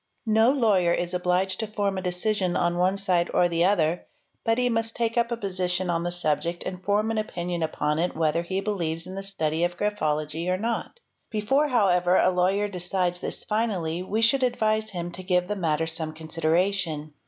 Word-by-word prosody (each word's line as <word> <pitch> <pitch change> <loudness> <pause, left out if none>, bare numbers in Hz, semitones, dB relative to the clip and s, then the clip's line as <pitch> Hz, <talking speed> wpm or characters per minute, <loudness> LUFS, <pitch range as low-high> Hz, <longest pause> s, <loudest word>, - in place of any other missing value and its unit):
' - - -49 0.2
No 230 - +6
lawyer 210 -10 +3
is 175 +1 -1
obliged 180 +1 0
to 220 - -1
form 205 -2 -1
a 190 - -3
decision 180 0 0
on 175 0 +1
one 185 +2 +2
side 180 -3 +1
or 175 - +5
the 170 0 +1
other, 175 -3 +1 0.4
but 225 0 +2
he 250 0 +2
must 225 -1 0
take 230 -1 -1
up 235 0 +1
a 235 - -1
position 185 -3 -1
on 165 -1 0
the 175 +1 -2
subject 170 0 -1
and 185 0 -6
form 210 +2 +1
an 220 - 0
opinion 175 -4 -3
upon 155 -1 -1
it 175 0 -1
whether 160 +1 +1
he 190 +3 -2
believes 170 -5 -2
in 185 - -8
the 195 - -4
study 165 -5 -1
of 175 0 -1
graphology 155 -5 -1
or 185 - +1
not; 230 - -3 0.3
before 270 +8 +1
however 185 -8 +3
a 185 - +4
lawyer 190 +3 +1
decides 180 -1 -1
this - - -5
finally 190 -7 -1
we 215 +5 -1
should 265 +4 +4
advise 220 -3 +1
him 175 -3 -5
to 175 +2 -8
give 180 -1 +1
the 210 - -2
matter 165 -4 0
some 160 -1 -4
consideration. 160 0 -1
180 Hz, 200 wpm, -26 LUFS, 170-210 Hz, 0.4 s, No